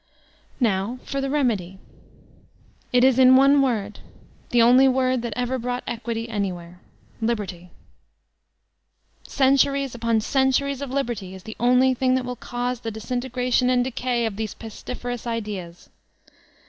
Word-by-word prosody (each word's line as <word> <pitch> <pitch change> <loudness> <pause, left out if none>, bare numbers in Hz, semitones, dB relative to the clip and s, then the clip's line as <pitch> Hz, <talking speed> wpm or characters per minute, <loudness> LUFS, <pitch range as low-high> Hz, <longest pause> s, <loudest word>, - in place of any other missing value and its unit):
Now 215 0 0
for 275 - -3
tile 275 - -2
remedy. 220 -11 -1 1.1
It 245 0 +4
is 260 -1 +4
in 260 0 +7
one 275 +2 +6
word, 215 -6 -1 0.5
the 240 - +2
only 250 +3 +6
word 255 -1 +1
that 235 -2 -4
ever 250 +1 -2
brought 245 +1 -3
equity 230 0 -4
anywhere 180 -5 -4 0.2
— - - -31
^Libebty! 200 -6 -3 1.6
Cen 270 0 +3
turies 275 -1 +1
upon 230 -1 0
centuries 270 +2 +1
of 280 - -4
liberty 235 -8 -3
is 190 - -12
the 220 0 -8
only 250 +2 +4
thing 255 0 +1
that 260 -1 -1
will 250 0 -4
cause 245 +1 -4
the 230 - -5
disintegration 250 +2 -1
and 250 -1 +3
decay 245 -1 -1
of 210 -3 -4
these 215 -2 -4
pesti 225 +2 -8
ferous 245 -1 -5
ideas. 205 -7 -5
245 Hz, 145 wpm, -23 LUFS, 220-260 Hz, 1.6 s, in